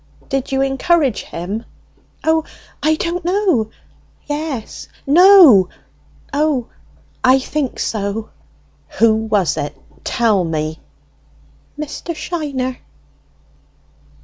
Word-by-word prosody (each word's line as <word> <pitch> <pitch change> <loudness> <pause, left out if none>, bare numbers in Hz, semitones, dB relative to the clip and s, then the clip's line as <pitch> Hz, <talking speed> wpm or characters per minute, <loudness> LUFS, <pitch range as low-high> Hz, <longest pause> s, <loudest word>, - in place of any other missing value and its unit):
"Did 270 -1 -2
you 270 0 +2
encourage 275 - +1
him?" 195 +7 -5 0.6
"O, 320 0 +2 0.4
I 315 +1 +3
don't 340 +2 -3
know, 355 - +1 0.6
yes 290 -6 -5 0.2
no. 310 - +7 0.6
O, 285 -4 0 0.5
I 255 +1 +6
think 270 0 -3
so!" 210 0 -3 0.7
"Who 225 +1 +5
was 215 -7 0
it?" 145 0 -3
A - - -30
pause. - - -28
"Tell 220 -5 +2
me!" 160 -1 -3 1.0
"Mr. 305 +3 -5
Shiner." 280 -7 -3
265 Hz, 95 wpm, -18 LUFS, 215-310 Hz, 1.0 s, no